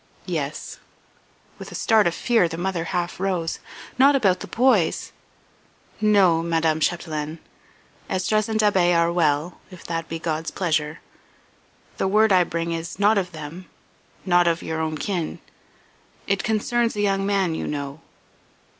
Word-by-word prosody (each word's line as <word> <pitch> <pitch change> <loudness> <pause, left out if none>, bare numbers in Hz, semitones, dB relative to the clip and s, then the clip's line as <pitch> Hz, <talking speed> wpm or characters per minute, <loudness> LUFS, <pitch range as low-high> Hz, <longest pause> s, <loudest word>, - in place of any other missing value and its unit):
"Yes." - - -4 0.8
With - - -9
a - - -8
start 220 -4 +3
of 170 - -1
fear 230 -8 +2
the 165 0 -6
mother 175 -1 -2
half 175 0 -3
rose. 185 -4 -1 0.4
"Not 275 +2 +6
about 195 -8 +2
the - - -7
boys?" 230 -9 +2 0.9
"No, 195 -6 +4
Madame 165 -1 +1
Chapdelaine. 155 -2 -2 0.7
Esdras 215 +3 0
and 220 0 0
Da'Be 185 -5 +3
are 170 0 +2
well, 160 0 0
if 185 -2 -12
that 165 -1 -4
be 165 - -3
God's 160 -1 -3
pleasure. 155 -3 -1 1.0
The - - 0
word 215 +2 +4
I 185 -1 +6
bring 170 0 -3
is 165 +1 -4
not 205 +1 +4
of 180 -2 -4
them 160 +2 -9 0.6
not 175 -2 +4
of 165 -1 0
your 160 0 -3
own 160 -1 -2
kin. 175 -2 -3 0.9
It 200 -1 0
concerns 230 +2 0
a 205 - -1
young 195 -1 +1
man 195 -4 +1
you - - -3
know." 145 +1 -5
175 Hz, 150 wpm, -23 LUFS, 165-200 Hz, 1.0 s, Not